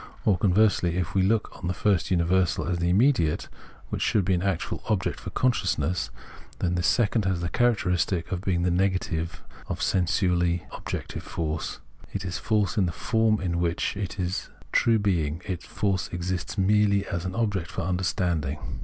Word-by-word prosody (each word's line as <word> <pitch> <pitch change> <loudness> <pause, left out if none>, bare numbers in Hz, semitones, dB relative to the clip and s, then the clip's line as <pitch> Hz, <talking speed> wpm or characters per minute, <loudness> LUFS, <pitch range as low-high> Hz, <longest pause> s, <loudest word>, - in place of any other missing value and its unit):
Or, 105 - +5
conversely, 90 -2 +3
if 90 -3 -2
we 95 - +3
look 105 +3 +1
on 85 - -4
the 90 - -1
first 95 -5 +1
universal 90 0 +2
as 90 0 -1
the 85 0 +1
immediate, 100 - +3 0.4
which - - -3
should 105 -4 +2
be 95 - +2
an 90 - +1
actual 95 -3 -1
object 100 -4 0
for - - -6
consciousness, 90 - 0 0.5
then 90 -1 0
this 85 -1 +1
second 110 -3 +2
has 95 -2 +1
the 85 - -1
characteristic 90 -7 +1
of 90 -2 -2
being 90 -3 0
the 90 - +2
negative 85 -4 -1 0.2
of - - -3
sensu 90 0 +2
ously 85 0 +1
objective - - -5
force: 80 -4 -4 0.3
it 100 -1 -3
is 90 -1 -3
force, 105 -2 +1
in 95 - +3
the - - -1
form 110 +4 +1
in 85 -2 -1
which, 85 +2 0
in 100 - -4 0.2
its 90 0 -2 0.2
true 115 -1 +4
being, 85 -7 0 0.2
force 95 +1 -1
exists 90 +3 -3
merely 100 0 +3
as 85 -3 -3
object 95 -3 -1
for - - -4
understanding. 90 -5 0
90 Hz, 170 wpm, -26 LUFS, 85-100 Hz, 0.5 s, Or